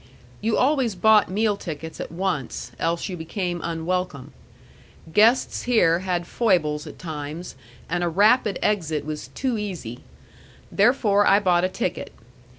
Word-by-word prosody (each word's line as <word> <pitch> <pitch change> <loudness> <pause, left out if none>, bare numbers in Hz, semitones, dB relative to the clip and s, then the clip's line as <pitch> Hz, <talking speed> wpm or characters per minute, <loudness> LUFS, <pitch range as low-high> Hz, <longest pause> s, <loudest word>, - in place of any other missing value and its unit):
You 220 +1 +1
always 260 -5 +2
bought 215 +2 +4
meal 210 +2 +1
tickets 160 -4 -7
at - - -6
once, 175 -7 -3
else 170 +1 -1
you 185 - -5
became 175 +1 -4
unwelcome. 170 -4 -3 0.8
Guests 225 +6 +3
here 195 -9 +3
had 180 -2 -2
foibles 170 -10 0
at - - -10
times, 155 +1 -6 0.3
and 175 +1 -1
a 175 - +1
rapid 210 +3 +3
exit 160 -8 0
was 155 0 -5
too 250 -4 -1
easy. 175 - -6 0.7
Therefore 205 -2 +3
I 200 - +6
bought 180 -3 +2
a - - 0
ticket. - - -3
180 Hz, 140 wpm, -23 LUFS, 165-210 Hz, 0.8 s, I